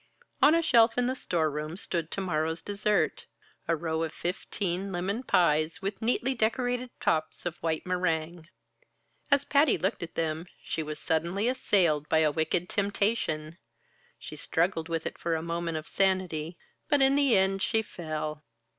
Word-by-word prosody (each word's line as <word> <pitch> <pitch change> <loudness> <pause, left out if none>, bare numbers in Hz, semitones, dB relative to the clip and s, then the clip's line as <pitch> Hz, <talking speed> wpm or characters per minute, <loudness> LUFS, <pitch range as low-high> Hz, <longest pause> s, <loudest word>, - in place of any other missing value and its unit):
On 300 +3 +7
a 335 - +2
shelf 230 -5 +5
in 245 - +2
the 255 - 0
storeroom 155 - -2
stood 170 -5 -2
to 195 - -3
morrow's 160 -2 -1
dessert 205 +1 0 0.4
a 165 - +2
row 160 0 -2
of 165 -1 -2
fifteen 185 +2 -3
lemon 190 +6 -2
pies, 160 -8 +2
with 195 0 -4
neatly 245 +3 +1
decorated 245 +2 0
tops 155 +2 -1
of 175 -1 -3
white 160 -1 -1
meringue. 170 -2 -1 0.8
As 280 0 +4
Patty 285 -1 +4
looked 190 +4 -1
at 170 - -6
them, 160 +1 -2 0.2
she 160 - -2
was 155 -1 -5
suddenly 170 +7 0
assailed 175 - +2
by 160 - +3
a 150 - +3
wicked 160 +3 0
temptation; 200 -6 -1 0.6
she - - -9
struggled 165 -1 0
with 165 -1 -2
it - - -5
for 170 -1 0
a 160 - -3
moment 170 -1 -2
of 155 - -7
sanity, 180 -4 0 0.3
but 290 -3 +5
in 270 0 +5
the 275 -6 +4
end 190 0 +2
she 220 +3 +1
fell. 155 -5 -5
175 Hz, 165 wpm, -28 LUFS, 160-210 Hz, 0.8 s, On